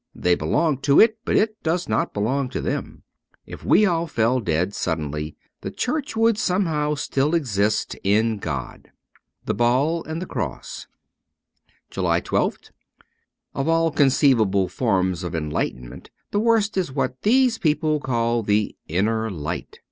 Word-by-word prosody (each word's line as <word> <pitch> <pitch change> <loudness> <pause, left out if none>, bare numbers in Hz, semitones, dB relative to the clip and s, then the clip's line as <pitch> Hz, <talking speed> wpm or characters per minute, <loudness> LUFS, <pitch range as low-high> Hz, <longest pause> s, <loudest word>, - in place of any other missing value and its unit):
They 90 - +2
belong 135 - +1
to 140 +1 +4
it, 220 0 +5
but - - 0
it 215 0 +1
does 170 +2 -1
not 110 - 0
belong 125 +6 -1
to - - -4
them. - - -4 0.4
If - - -10
we 215 - +4
all 170 -3 0
fell 120 -2 +1
dead 90 -1 -1
suddenly, 75 -4 -3 0.3
the - - -4
Church 290 +1 -3
would 225 -1 +3
still 180 -4 +1
somehow 150 -6 0 0.4
exist 110 -9 0
in 110 +2 +2
God.' 70 -9 -6 0.3
' - - -45
"The - - 0
Ball 135 +8 +1
and 160 +1 -4
the 180 - -4
Cross.' 95 - -5 1.0
213 - - -1
JULY - - +3
1 - - +1
2th - - -22 0.8
OF 135 - -2
all 165 0 +2
conceivable 125 -9 +3
forms 95 -7 0
of 85 -2 -4
enlightenment 65 -5 -4 0.2
the 205 - +1
worst 220 -2 +2
is 180 -7 0
what 130 -1 -2
these 245 0 +3
people 155 -1 +1
call 120 -3 0
the 105 0 0
Inner 110 +6 0
Light. 80 -6 -5
130 Hz, 155 wpm, -23 LUFS, 100-165 Hz, 1.0 s, it